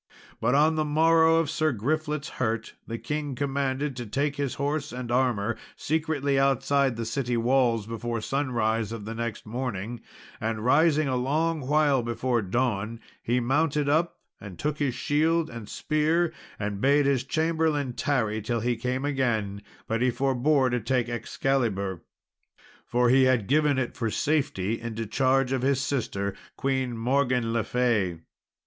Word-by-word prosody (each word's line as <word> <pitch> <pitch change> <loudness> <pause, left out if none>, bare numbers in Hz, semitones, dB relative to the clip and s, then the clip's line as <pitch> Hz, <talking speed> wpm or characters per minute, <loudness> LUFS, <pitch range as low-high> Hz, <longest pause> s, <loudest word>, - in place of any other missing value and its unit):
But 125 +4 +2
on 155 +2 +4
the 155 - +2
morrow 160 +2 +4
of 165 -1 +2
Sir 155 +1 +1
Griflet's 150 +5 -2
hurt, 115 -2 -1
the 115 - -4
king 150 +1 -3
commanded 140 0 -1
to 120 -2 -5
take 140 +6 -1
his 140 -2 -2
horse 145 +1 -2
and 125 -1 -5
armour 120 -3 +1 0.2
secretly 145 -3 0
outside 135 -1 +2
the 115 0 -4
city 120 +1 -1
walls 120 -2 +2
before 115 +1 -3
sunrise 115 -4 -1
of 115 -3 -6
the 110 - -5
next 115 -1 -4
morning, 115 -1 -4 0.4
and, 110 0 -2
rising 155 +2 +4
a 130 - 0
long 155 +6 0
while 145 -2 +3
before 120 +1 -1
dawn, 110 +1 -1 0.2
he 120 +2 +1
mounted 145 +4 +1
up 160 +4 +1 0.2
and 95 -4 -10
took 150 0 -2
his 135 -5 0
shield 160 +2 +1
and 115 -3 -8
spear, 160 +2 +1 0.2
and 105 -1 -3
bade 140 +1 +4
his 135 -2 +2
chamberlain 155 -2 0
tarry 110 -6 0
till 115 +2 -2
he 120 +1 0
came 125 +4 -2
again; 110 -8 -1 0.2
but 115 +1 -1
he 125 - +3
forbore 130 +2 +2
to 125 - +1
take 120 +1 0
Excalibur, 115 -7 -1 0.9
for 120 0 +2
he 130 +1 +5
had 130 -5 +2
given 150 +2 +3
it 130 -3 -2
for 115 -4 -1
safety 115 -7 0
into 115 -1 -4
charge 130 +3 +2
of 135 -2 0
his 135 0 +2
sister, 100 -8 -2 0.2
Queen 130 -3 -1
Morgan 125 -1 +1
le 115 -1 +1
Fay. 110 -9 +1
130 Hz, 155 wpm, -26 LUFS, 115-145 Hz, 0.9 s, he